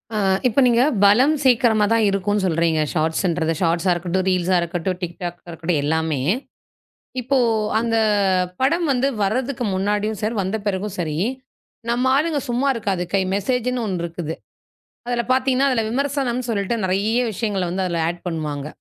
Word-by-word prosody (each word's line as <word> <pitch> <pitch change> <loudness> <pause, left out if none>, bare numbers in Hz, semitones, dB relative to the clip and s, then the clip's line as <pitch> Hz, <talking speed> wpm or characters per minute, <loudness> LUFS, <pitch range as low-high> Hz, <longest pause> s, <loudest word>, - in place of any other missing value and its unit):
அ, - - 0 0.3
இப்ப 250 +4 +1
நீங்கப் 245 +1 +3
பலம் 250 +10 +5
சேக்கிரமா 235 -4 +4
தான் 225 -1 +3
இருக்கும்னு 200 +1 0
சொல்றீங்க 165 -2 +1
ஷார்ட்ஷ்ன்றது. 165 0 0
ஷார்ட்ஷ்ஷா 170 +2 +2
இருக்கட்டும், 180 +2 -2
ரீல்ஷ்ஷா 185 0 +2
இருக்கட்டும், 175 +2 -2
TikTokஆ 175 0 -6
இருக்கட்டும் 165 -1 -1
எல்லாமே. 160 -1 0 1.0
இப்போ 265 +3 0 0.4
அந்த 230 -1 0 0.6
படம் 335 +6 +2
வந்து 260 +2 +1
வர்றதுக்கு 245 +5 -1
முன்னாடியும் 205 +2 -1
சார் 220 +2 -1
வந்த 190 +4 -2
பிறகும் 200 0 -2
சரி 155 -3 -2 0.7
நம்மாளுங்க 270 +6 +2
சும்மா 250 +4 +1
இருக்காது 195 -5 -2
கை 195 - +3
மெசேஜ்ன்னு 250 +3 -1
ஒண்ணு 180 -4 -2
இருக்குது. 165 -1 -4 0.7
அதுல 240 -1 0
பார்த்தீங்கன்னா, 260 +1 +2
அதுல 230 -4 +1
விமர்சனம்னு 255 -1 -1
சொல்லிட்டு 200 +1 -1
நிறைய 205 +6 +1
விஷயங்களை 200 -3 -2
வந்து 190 +2 -2
அதுல 170 -2 -1
ஆட் 175 +1 -4
பண்ணுவாங்க. 150 -3 -3
200 Hz, 140 wpm, -21 LUFS, 175-245 Hz, 1.0 s, பலம்